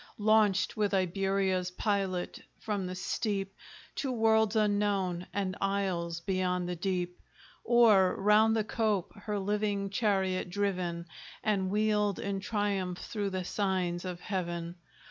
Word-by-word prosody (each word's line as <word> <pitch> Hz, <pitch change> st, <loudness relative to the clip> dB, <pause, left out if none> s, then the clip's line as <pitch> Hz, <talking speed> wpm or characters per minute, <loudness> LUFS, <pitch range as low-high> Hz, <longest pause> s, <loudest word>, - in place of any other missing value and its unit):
Launched 210 Hz, -2 st, +3 dB
with 205 Hz, -2 st, +1 dB
Iberia's 190 Hz, 0 st, +1 dB
pilot 190 Hz, -1 st, -2 dB, 0.2 s
from 205 Hz, -4 st, -2 dB
the 185 Hz, -, -5 dB
steep, 195 Hz, +1 st, -2 dB, 0.4 s
To 270 Hz, -, -1 dB
worlds 220 Hz, -2 st, +3 dB
unknown, 205 Hz, -4 st, +1 dB
and 190 Hz, -2 st, -2 dB
isles 185 Hz, -4 st, -1 dB
beyond 180 Hz, -1 st, -1 dB
the 180 Hz, -, -2 dB
deep? 180 Hz, 0 st, -2 dB, 0.4 s
Or 220 Hz, -6 st, +5 dB
round 210 Hz, +2 st, +5 dB
the 220 Hz, -, +1 dB
cope 215 Hz, -4 st, -1 dB
her 210 Hz, 0 st, -4 dB
living 200 Hz, 0 st, -1 dB
chariot 190 Hz, -4 st, 0 dB
driven, 180 Hz, -3 st, -2 dB, 0.4 s
And 195 Hz, -3 st, +1 dB
wheeled 210 Hz, 0 st, +1 dB
in 200 Hz, -1 st, -3 dB
triumph 195 Hz, -3 st, -1 dB
through 205 Hz, 0 st, -3 dB
the 185 Hz, -1 st, -3 dB
signs 185 Hz, -3 st, -1 dB
of 180 Hz, -2 st, -5 dB
Heaven? 175 Hz, -3 st, -3 dB
195 Hz, 125 wpm, -30 LUFS, 185-210 Hz, 0.4 s, Or